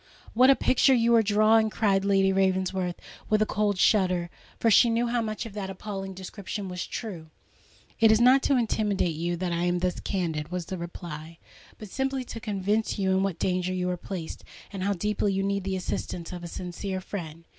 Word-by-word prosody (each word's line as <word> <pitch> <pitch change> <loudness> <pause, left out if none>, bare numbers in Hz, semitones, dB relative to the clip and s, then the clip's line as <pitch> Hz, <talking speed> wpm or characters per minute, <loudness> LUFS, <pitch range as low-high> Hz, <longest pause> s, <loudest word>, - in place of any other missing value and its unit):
what 255 +3 +6
a 275 - +7
picture 260 +1 +4
you 235 0 +3
are 230 - +6
drawing!" 215 +1 +4
cried 200 -3 +1
Lady 195 -1 +3
Ravensworth, 190 -1 0 0.3
with 215 - +3
a 215 - +3
cold 210 -2 0
shudder—for 185 +3 +1
she 235 +4 +6
knew 230 +1 +1
how 240 0 0
much 215 +1 -4
of 225 - -8
that 200 -2 -4
appalling 195 0 -6
description 195 +2 -6
was 180 -1 -5
true! 175 -9 -6 0.7
"It 225 -1 +6
is 220 - +4
not 255 +3 +6
to 275 - +2
intimidate 210 -6 0
you, 170 +2 -2
that 180 0 -2
I 170 +1 0
am 175 0 +1
thus 180 0 -1
candid," 160 -5 -2
was 180 -1 -3
the 190 - -5
reply; 170 -2 -8 0.4
"but 215 -3 -10
simply 265 0 -1
to 230 - -8
convince 210 +1 -1
you 190 -2 +1
in 190 0 +2
what 195 -3 -1
danger 185 +1 -1
you 180 0 -1
are - - -1
placed, 175 -2 -7 0.3
and 195 - -5
how 200 +2 +1
deeply 205 +1 -1
you 195 0 0
need 200 -1 -1
the 195 -1 -1
assistance 180 -1 -4
of 175 -1 -7
a - - -5
sincere 185 +2 -5
friend." 165 -4 -7
195 Hz, 200 wpm, -27 LUFS, 180-215 Hz, 0.7 s, a